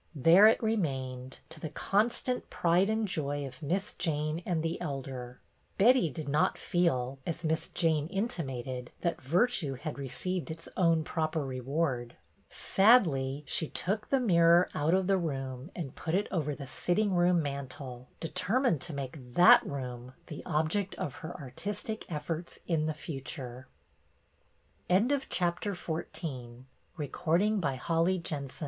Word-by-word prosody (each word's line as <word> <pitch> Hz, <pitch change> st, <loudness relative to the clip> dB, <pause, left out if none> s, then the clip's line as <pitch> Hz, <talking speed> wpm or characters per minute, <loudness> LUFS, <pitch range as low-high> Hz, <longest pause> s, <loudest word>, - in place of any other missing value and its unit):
There 165 Hz, +9 st, +7 dB
it 225 Hz, -, +3 dB
remained, 135 Hz, -, -2 dB
to 160 Hz, 0 st, -9 dB
the 155 Hz, -, -4 dB
con 205 Hz, +9 st, +2 dB
stant 250 Hz, +1 st, -4 dB
pride 175 Hz, +4 st, +2 dB
and 220 Hz, 0 st, +1 dB
joy 145 Hz, -5 st, -2 dB
of 130 Hz, +2 st, -10 dB
Miss 190 Hz, +7 st, -1 dB
Jane 155 Hz, 0 st, -1 dB
and 165 Hz, -3 st, 0 dB
the 165 Hz, +2 st, -2 dB
Elder. 135 Hz, -5 st, -5 dB, 0.4 s
Betty 240 Hz, -3 st, +5 dB
did 150 Hz, +2 st, -6 dB
not 150 Hz, +2 st, +2 dB
feel, 135 Hz, -7 st, 0 dB
as 170 Hz, +2 st, -4 dB
Miss 160 Hz, 0 st, 0 dB
Jane 160 Hz, -3 st, +1 dB
in 195 Hz, +5 st, 0 dB
timated, 130 Hz, -, -4 dB
that 170 Hz, -1 st, -1 dB
virtue 170 Hz, -, +1 dB
had 145 Hz, +3 st, -6 dB
received 175 Hz, +7 st, -3 dB
its 165 Hz, +1 st, -7 dB
own 165 Hz, -3 st, +3 dB
proper 155 Hz, -1 st, -1 dB
reward. 130 Hz, -1 st, -2 dB, 0.3 s
Sadly 150 Hz, -, +3 dB
she 160 Hz, -, 0 dB
took 210 Hz, +3 st, -2 dB
the 270 Hz, -, +3 dB
mirror 170 Hz, -6 st, +5 dB
out 155 Hz, +4 st, +2 dB
of 190 Hz, 0 st, +2 dB
the 195 Hz, 0 st, +3 dB
room 135 Hz, -3 st, -4 dB
and 155 Hz, -7 st, -5 dB
put 165 Hz, +1 st, -2 dB
it 200 Hz, +2 st, +1 dB
over 150 Hz, -5 st, -1 dB
the 140 Hz, -, -7 dB
sitting 190 Hz, +9 st, 0 dB
room 175 Hz, 0 st, +4 dB
mantel, 135 Hz, -3 st, -6 dB
determined 195 Hz, -, +1 dB
to 175 Hz, -4 st, -3 dB
make 130 Hz, -2 st, -7 dB
that 235 Hz, +7 st, +8 dB
room 125 Hz, -2 st, -6 dB
the 150 Hz, -, -7 dB
object 170 Hz, +5 st, 0 dB
of 140 Hz, -, -4 dB
her 165 Hz, +2 st, -7 dB
artistic 200 Hz, -, -5 dB
efforts 165 Hz, +2 st, -4 dB
in 155 Hz, -3 st, +1 dB
the 155 Hz, -, -2 dB
future. 130 Hz, -4 st, -7 dB
160 Hz, 135 wpm, -30 LUFS, 135-180 Hz, 0.4 s, that